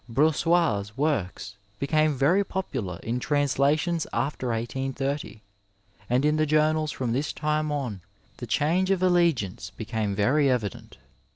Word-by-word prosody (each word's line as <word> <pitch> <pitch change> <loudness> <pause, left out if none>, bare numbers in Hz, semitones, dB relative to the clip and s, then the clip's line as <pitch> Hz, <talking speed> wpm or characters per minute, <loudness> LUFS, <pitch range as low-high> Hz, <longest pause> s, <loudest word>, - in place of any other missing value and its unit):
Brous 150 +5 +3
sais' 150 - +1
works 105 - -2 0.2
became 155 +2 +1
very 165 +10 +3
popular 130 - -4
in 120 +2 -2
translations 145 +4 +1
after 135 -2 -2
1830, 130 +1 -3 0.7
and 125 +4 +2
in 150 +1 +3
the 155 0 +2
journals 155 0 +2
from 125 -3 -2
this 140 +4 -1
time 150 0 -1
on 125 -10 -3 0.4
the 120 - -7
change 160 - +1
of 190 -2 +1
alli 175 -2 +5
ance 100 +4 -8
became 110 -2 -3
very 135 +8 +3
evident. 110 - -3
140 Hz, 135 wpm, -26 LUFS, 115-155 Hz, 0.7 s, alli